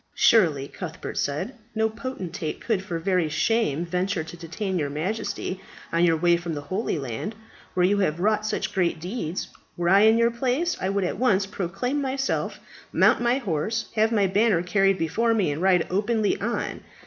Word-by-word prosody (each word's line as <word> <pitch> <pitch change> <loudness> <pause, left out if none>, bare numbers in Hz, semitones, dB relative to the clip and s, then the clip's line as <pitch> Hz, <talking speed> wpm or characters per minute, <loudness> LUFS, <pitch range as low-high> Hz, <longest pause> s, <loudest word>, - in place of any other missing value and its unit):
"Surely," 160 -11 +4
Cuthbert 165 -1 -7
said, 145 - -2 0.2
"no 220 0 +2
potentate 205 - -5
could 210 -5 -1
for 175 -3 -3
very 180 -1 +1
shame 175 -3 +1
venture 180 0 -1
to 160 - -9
detain 180 +3 -3
your 145 -2 -1
Majesty 185 +4 -3 0.3
on 170 +1 +3
your 165 -2 +4
way 175 +1 +4
from 170 -2 -4
the 145 - -4
Holy 185 +4 -2
Land, 135 - -4 0.4
where 180 -1 +4
you 200 +2 +2
have 170 -4 0
wrought 215 +3 +2
such 215 - -2
great 175 -4 +1
deeds. 180 -1 -4 0.3
Were 175 0 +1
I 195 +2 +7
in 220 +2 +6
your 235 0 +3
place, 260 +8 0
I 190 - 0
would 200 0 0
at 180 - -2
once 205 -6 +3
proclaim 200 +9 -2
myself, 270 0 -1 0.3
mount - - +4
my 240 +2 +2
horse, 220 - -2
have 220 +1 +2
my 210 -3 +3
banner 195 -2 +2
carried 195 +1 +2
before 225 +8 +1
me, 195 -9 +1
and 145 +3 -4
ride 185 -2 +4
openly 210 +2 +1
on. 235 +3 -2
190 Hz, 185 wpm, -25 LUFS, 170-220 Hz, 0.4 s, I